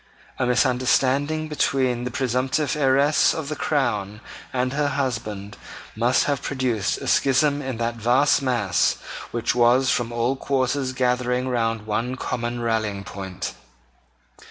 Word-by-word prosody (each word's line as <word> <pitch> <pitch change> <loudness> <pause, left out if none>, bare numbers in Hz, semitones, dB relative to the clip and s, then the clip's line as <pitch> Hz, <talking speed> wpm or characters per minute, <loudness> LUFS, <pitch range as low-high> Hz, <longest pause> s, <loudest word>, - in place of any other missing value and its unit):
A 125 - +1
misunderstanding 135 +4 +2
between 130 -5 0
the - - -2
presumptive 130 +3 0
heiress 140 +1 +3
of 155 -3 -4
the 155 - -3
crown 105 -10 -1 0.3
and 130 0 -1
her 145 0 +1
husband 110 -8 -3 0.4
must 120 +3 +2
have 140 -3 -1
produced 125 -7 -1
a - - -7
schism 140 +2 +3
in 130 -4 -4
that 115 0 -2
vast 125 +7 +3
mass 115 - +1 0.3
which 120 0 -1
was 120 +2 +4
from 120 -1 -1
all 120 +3 0
quarters 135 0 -1
gathering 125 0 0
round 115 -3 -1
one 115 +4 -2
common 120 -1 -3
rallying 110 -4 -1
point. 95 -1 -6
125 Hz, 130 wpm, -23 LUFS, 115-135 Hz, 0.4 s, was